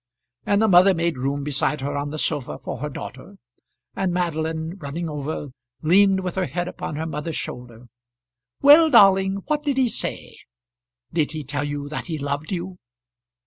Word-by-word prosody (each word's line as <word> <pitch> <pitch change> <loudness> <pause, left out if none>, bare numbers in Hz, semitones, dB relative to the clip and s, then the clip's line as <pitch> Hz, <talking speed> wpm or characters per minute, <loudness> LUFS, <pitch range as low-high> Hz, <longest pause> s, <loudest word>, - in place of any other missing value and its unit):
And 205 +1 +3
the - - +4
mother 185 0 +6
made 165 -4 -1
room 140 +2 -1
beside 145 0 -1
her 140 +1 -3
on 145 0 -2
the 155 - -5
sofa 145 -3 -1
for - - -6
her 150 +3 -3
daughter, 135 +6 -9 0.6
and 190 -2 0
Madeline, 160 -1 -2
running 160 +3 -4
over, 150 -1 -4 0.3
leaned 190 +4 +4
with 180 -2 -3
her 190 -1 -1
head 175 0 -3
upon 155 - -5
her 160 +2 -3
mother's 155 0 -4
shoulder. 125 -1 -7 0.8
"Well, 305 +3 +8
darling; 195 -5 +5
what 300 -1 0
did 285 -3 -1
he 255 -2 +3
say? - - -5 0.7
Did 155 -2 0
he 155 -1 -4
tell 145 +1 -3
you 145 0 -4
that 150 - -5
he 160 -3 -3
loved 145 +3 -3
you?" 180 0 -4
160 Hz, 175 wpm, -23 LUFS, 145-190 Hz, 0.8 s, Well